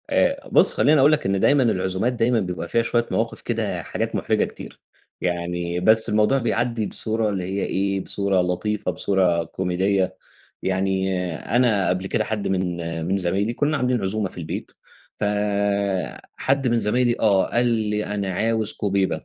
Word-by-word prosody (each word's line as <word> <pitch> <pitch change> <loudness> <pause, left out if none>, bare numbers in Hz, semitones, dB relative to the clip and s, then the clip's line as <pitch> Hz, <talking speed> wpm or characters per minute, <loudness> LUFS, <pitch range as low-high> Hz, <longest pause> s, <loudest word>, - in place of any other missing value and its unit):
آآآ - - +1
بُصّ، - - +6
خلّيني 150 0 +4
أقول 140 +3 +6
لك 155 - +1
إن 95 0 +1
دايمًا 140 +5 +4
العزومات 95 +1 0
دايمًا 120 0 +2
بيبقى 90 -4 -4
فيها 115 - +2
شوية 120 0 +1
مواقِف - - -1
كده - - -2
حاجات - - -3
مُحرِجة - - +1
كتير. - - -11 0.4
يعني 85 0 -2
بس 110 +4 +4
الموضوع 105 +5 +3
بيعدّي 120 -2 0
بصورة 110 +1 0
اللي 95 -3 -2
هي 95 +2 -2
إيه، 100 0 -1
بصورة 100 -2 0
لطيفة، 90 +3 -1
بصورة 90 -1 +1
كوميدية. 95 +2 -1 0.5
يعني 95 0 0 0.4
أنا 110 -7 +3
قبل 90 +1 -1
كده 110 - 0
حد 105 -1 -3
من 90 -2 -1 0.3
من 95 +2 +1
زمايلي 100 +5 0
كُنّا 145 +5 0
عاملين 125 -3 0
عزومة 100 +1 -1
في - - -14
البيت، 80 -2 -5 0.5
فحد 100 +5 -1
من 120 -1 +2
زمايلي 120 +2 +1
آه، 100 -4 +3
قال 120 +1 +2
لي: 105 -3 0
"أنا 100 -2 -3
عاوز 110 +2 0
كُوبيبة." 100 -2 -1
100 Hz, 160 wpm, -23 LUFS, 95-115 Hz, 0.5 s, بُصّ